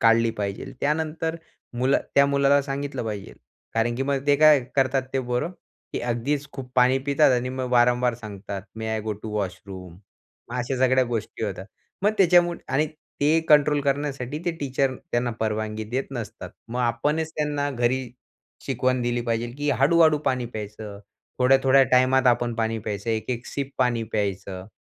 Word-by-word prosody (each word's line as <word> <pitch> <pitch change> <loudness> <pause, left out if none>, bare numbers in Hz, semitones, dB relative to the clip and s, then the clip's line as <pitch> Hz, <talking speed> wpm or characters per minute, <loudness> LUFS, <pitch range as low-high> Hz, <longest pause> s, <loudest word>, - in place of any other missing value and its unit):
काढली 115 0 +4
पाहिजे. 100 -1 -3 0.2
त्यानंतर 160 +2 -1 0.4
मुलं 130 +3 +2 0.2
त्या 140 0 +6
मुलाला 140 0 +3
सांगितलं 140 -2 -4
पाहिजे, 105 -3 -5 0.4
कारण 115 +1 +1
की 135 - -1
मग 140 0 -1
ते 145 0 +5
काय 155 -2 +7 0.2
करतात 135 0 +2
ते 135 - +2
पोरं, 125 +7 -1 0.4
की - - -2
अगदीच 125 +5 -1
खूप 130 -2 -8
पाणी 125 +1 +5
पितात 140 0 +4
आणि 125 0 0
मग 130 -1 -4
वारंवार 120 0 +3
सांगतात, 100 -3 -7
"मे 110 0 -4
आय 110 0 -1
गो 110 -1 -2
टू 110 - -5
वॉशरूम?" 95 -2 -5 0.6
मग 125 - -4
अशा 125 +2 -2
सगळ्या 130 0 +3
गोष्टी 115 -1 -4
होतात. 95 -1 -5 0.4
मग 210 +1 +3
त्याच्यामुळ 175 -2 +5
आणि 150 +3 +2 0.3
ते 155 +3 +4
कंट्रोल 150 -1 +5
करण्यासाठी, 140 0 -2
ते 175 - +1
टीचर 135 -1 0 0.2
त्यांना 120 0 +1
परवानगी 110 0 -2
देत 125 +5 -2
नसतात. 115 -4 -6 0.2
मग 125 +2 -3
आपणच 145 +7 0
त्यांना 145 -1 -1
घरी 125 0 0 0.6
शिकवण 130 -1 0
दिली 120 0 0
पाहिजे 115 0 -2
की 145 0 0
हळू-हळू 155 +1 +5
पाणी 125 -2 +1
प्यायचं, 105 -1 -7 0.4
थोड्या-थोड्या 135 +1 +5
टायमात 130 +1 +4
आपण 120 -1 +2
पाणी 115 0 -1
प्यायचं, 105 +1 -4
एक-एक 115 +2 -3
सिप 140 -1 -4
पाणी 120 -2 +2
प्यायचं. 95 -2 -3
125 Hz, 160 wpm, -24 LUFS, 115-140 Hz, 0.6 s, काय